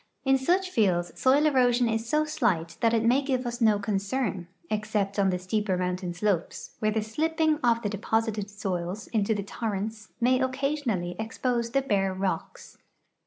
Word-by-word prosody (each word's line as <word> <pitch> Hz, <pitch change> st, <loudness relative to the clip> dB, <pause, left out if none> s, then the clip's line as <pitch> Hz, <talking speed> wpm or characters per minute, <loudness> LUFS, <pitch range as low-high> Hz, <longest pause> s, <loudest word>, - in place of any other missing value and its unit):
In 270 Hz, 0 st, +4 dB
such 365 Hz, +7 st, +1 dB
fields 180 Hz, -, +1 dB
soil 275 Hz, +3 st, +3 dB
erosion 250 Hz, -4 st, +3 dB
is 225 Hz, +1 st, -2 dB
so 305 Hz, +2 st, +2 dB
slight 170 Hz, -, 0 dB
that 230 Hz, -, +4 dB
it 225 Hz, -1 st, +2 dB
maj^ 250 Hz, +5 st, +3 dB
give 255 Hz, -2 st, 0 dB
us 240 Hz, 0 st, -4 dB
no 215 Hz, -2 st, +5 dB
concern, 200 Hz, -1 st, -2 dB, 0.2 s
except 210 Hz, -2 st, -1 dB
on 195 Hz, -1 st, +3 dB
the 180 Hz, -, 0 dB
.steeper 190 Hz, +1 st, -1 dB
mountain 180 Hz, 0 st, -2 dB
slopes, 180 Hz, -1 st, -2 dB
where 215 Hz, -, +1 dB
the 215 Hz, +1 st, 0 dB
slii>ping 310 Hz, +7 st, 0 dB
of 235 Hz, -1 st, +3 dB
the 205 Hz, -, 0 dB
deposited 215 Hz, 0 st, -1 dB
soils 190 Hz, -1 st, -4 dB
into 220 Hz, -1 st, +1 dB
the 200 Hz, -, -2 dB
torrents 215 Hz, +1 st, -4 dB
may 255 Hz, +1 st, +3 dB
occasionally 260 Hz, -9 st, -1 dB
exi)ose 235 Hz, +1 st, -1 dB
the 275 Hz, 0 st, +2 dB
bare 195 Hz, -6 st, +1 dB
rocks. 190 Hz, 0 st, -4 dB
220 Hz, 165 wpm, -27 LUFS, 195-255 Hz, 0.2 s, no